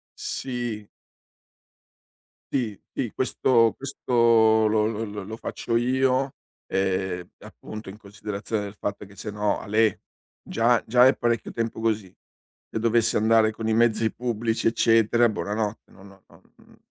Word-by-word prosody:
Sì. 120 -5 -4 1.7
Sì, 115 -7 -1
sì, 120 - -2
questo 120 -3 +2
questo 115 -4 +3
lo 105 0 +2
lo 110 0 -2
lo 105 -1 -6
lo 110 +3 -7
faccio 115 0 -2
io, 130 +2 +1 0.3
ehm, 95 -2 -1
appunto 110 0 -10
in 95 - -8
considerazione 105 +1 -5
del 100 -1 -7
fatto 100 0 -5
che 100 0 -16
se 105 +2 -6
no, 105 0 0
alè: 110 0 +2 0.5
già 115 0 +2
già 125 +2 +6
è 130 - +4
parecchio 120 -1 -1
tempo 115 -1 -3
così; 110 -4 -1 0.6
se - - -4
dovesse 115 0 +2
andare 110 0 +4
con 110 0 -4
i - - +2
mezzi 110 -1 +2
pubblici, 115 -2 -1
eccetera, 115 +1 +3
buonanotte, 105 0 -3
no 95 - -16
no 95 -1 -16
non - - -20 0.2
n - - -21
110 Hz, 140 wpm, -25 LUFS, 105-115 Hz, 1.7 s, già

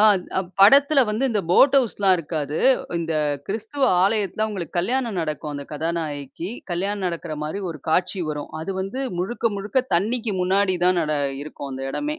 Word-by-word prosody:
அ - - +6 0.6
படத்துல 280 +7 +7
வந்து 225 +6 0
இந்த 215 -3 +1
போட் 265 +10 +6
ஹவுஸ் 250 -5 +2
எல்லாம் 195 -2 +5
இருக்காது. 150 -2 -3 0.4
இந்த 165 -1 -2 0.3
கிறிஸ்துவ 225 +7 -2 0.2
ஆலயத்துல 210 +1 +1
உங்களுக்கு 180 -4 -4
கல்யாணம் 235 +2 0
நடக்கும். 155 -1 -4
அந்த 140 0 -5
கதாநாயகிக்கு 155 0 -3 0.2
கல்யாணம் 195 +3 -2
நடக்கற 170 -3 -4
மாரி 175 +7 -4
ஒரு 155 - -9
காட்சி 180 +2 +1
வரும். 150 0 -6
அது 190 +4 -4
வந்து 195 +8 -3 0.2
முழுக்க 230 +4 -1
முழுக்க 210 +6 0
தண்ணிக்கு 220 +3 0
முன்னாடி 190 0 +2
தான் 180 -1 +4
நட 155 -1 -1 0.3
இருக்கும். 145 -2 -8
அந்த 135 +1 -6
இடமே, 300 - -3
190 Hz, 165 wpm, -23 LUFS, 160-220 Hz, 0.6 s, படத்துல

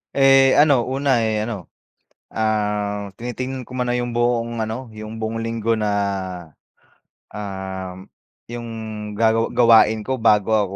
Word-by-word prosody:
Eh, 135 -1 +6
ano 140 -5 +4
una, 135 -1 +1
eh, 110 -1 0
ano, 105 -6 -6 0.7
ah, 105 -2 -1
tinitignan 125 +3 -5
ko 125 +1 -9
muna 125 -1 0
yung 120 0 -1
buong 120 0 0
ano, 110 +3 -4
yung 110 +1 -8
buong 110 +1 -2
linggo 115 0 -1
na, 105 -1 0 1.4
ah, 95 -2 -6 0.6
yung 120 0 -6 0.5
gagawa 115 +1 +2
gawain 110 -2 +5
ko 130 +3 -2
bago 105 -2 +3
ako 100 -3 +1
115 Hz, 130 wpm, -21 LUFS, 105-120 Hz, 1.4 s, Eh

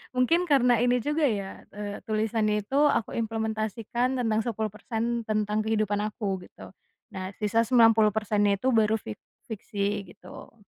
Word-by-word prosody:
mungkin 330 +8 +3
karena 250 -4 +4
ini 245 +1 +2
juga 295 +2 +1
ya, 200 -5 -4
eee, 205 0 -5
tulisannya 215 -1 0
itu 265 +7 -2
aku 230 - 0
implementasikan 225 +2 -2
tentang 225 -3 +1
10% 225 +1 -3
tentang 215 0 0
kehidupan 215 -2 0
aku 195 -5 -3
gitu, - - -13 0.4
nah 190 0 -6
sisa 225 +2 +2
90% 220 -3 +4
nya 200 - +3
itu 260 - +1
baru 220 -2 +3
fik 110 - -7 0.3
fiksi 205 -3 -3
gitu. 205 - -13
220 Hz, 140 wpm, -27 LUFS, 210-235 Hz, 0.4 s, karena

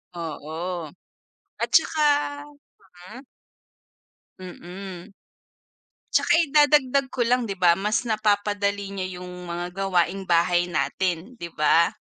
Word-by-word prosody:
Oo 165 +1 -5 0.7
at - - -2
saka 310 -1 +4 1.1
mm. 255 - -9 1.2
Mm. 185 +1 -9 1.0
At - - +3
saka - - +4
idadagdag 290 -3 +3
ko 255 - -2
lang, 245 +2 +2
'di 200 - -3
ba 170 -1 +5
mas 210 +3 0
napapadali 205 -2 0
niya 195 -2 -4
'yung 180 - -8 0.2
mga 175 0 -4
gawaing 190 0 0
bahay 175 0 +3
natin, 175 - -2
'di 170 - -7
ba? 155 +2 +3
190 Hz, 110 wpm, -24 LUFS, 175-215 Hz, 1.2 s, ba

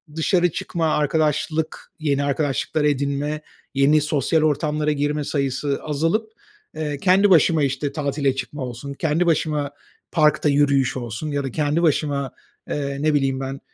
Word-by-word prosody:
dışarı 175 +2 +2
çıkma, 165 -1 -1
arkadaşlık, 155 +1 -1
yeni 145 -2 0
arkadaşlıklar 145 +1 -1
edinme, 145 +1 0 0.3
yeni 145 +2 +4
sosyal 150 +1 +1
ortamlara 150 0 +1
girme 150 +1 -1
sayısı 140 0 -1
azalıp, 165 +9 -1 0.4
eee, 150 -2 -3
kendi 195 +4 +4
başıma, 160 -3 +5
işte, 140 +1 -1
tatile 140 -2 0
çıkma 135 +2 -5
olsun, 125 +3 -7
kendi 155 +5 0
başıma 150 -3 0 0.4
parkta 150 -2 +3
yürüyüş 140 -2 +2
olsun 120 +5 -5
ya 140 -1 -1
da 135 - -4
kendi 150 +5 0
başıma, 145 -3 +1 0.4
eee, 140 -1 -2
ne 155 0 +2
bileyim 135 -2 +1
ben, 135 +1 -5
150 Hz, 140 wpm, -22 LUFS, 140-155 Hz, 0.4 s, başıma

